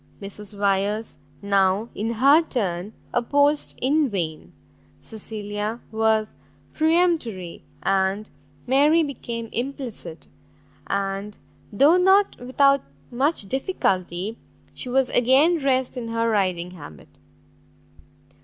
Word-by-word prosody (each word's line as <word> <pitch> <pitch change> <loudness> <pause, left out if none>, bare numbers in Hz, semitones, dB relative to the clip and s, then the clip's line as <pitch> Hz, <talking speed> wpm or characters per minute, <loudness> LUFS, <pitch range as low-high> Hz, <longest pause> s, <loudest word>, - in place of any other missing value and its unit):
Mrs 205 +1 -8
Wyers 200 -1 0 0.2
now 200 +2 +2
in 225 +3 -2
her 275 +7 +5
turn 200 - -3 0.2
opposed 285 +5 +1
in 290 +2 +3
vain; 165 -7 -4 0.5
Cecilia 210 0 -5
was 220 -1 +1 0.4
peremptory, 315 - 0 0.2
and 195 +2 +1 0.4
Mary 295 +6 +4
became 235 -5 -5
implicit, 240 - -5 0.6
and, 200 +1 -3 0.3
though 285 - +5
not 385 +2 +4
without 275 +2 +3 0.3
much 265 -3 0
difficulty, 195 - -2 0.3
she 255 - -7
was 265 0 +2
again 275 +8 +4
dressed 260 -2 0
in 245 -2 -5
her 230 0 0
riding 185 -5 0
habit. 110 - -13
225 Hz, 100 wpm, -23 LUFS, 200-275 Hz, 0.6 s, her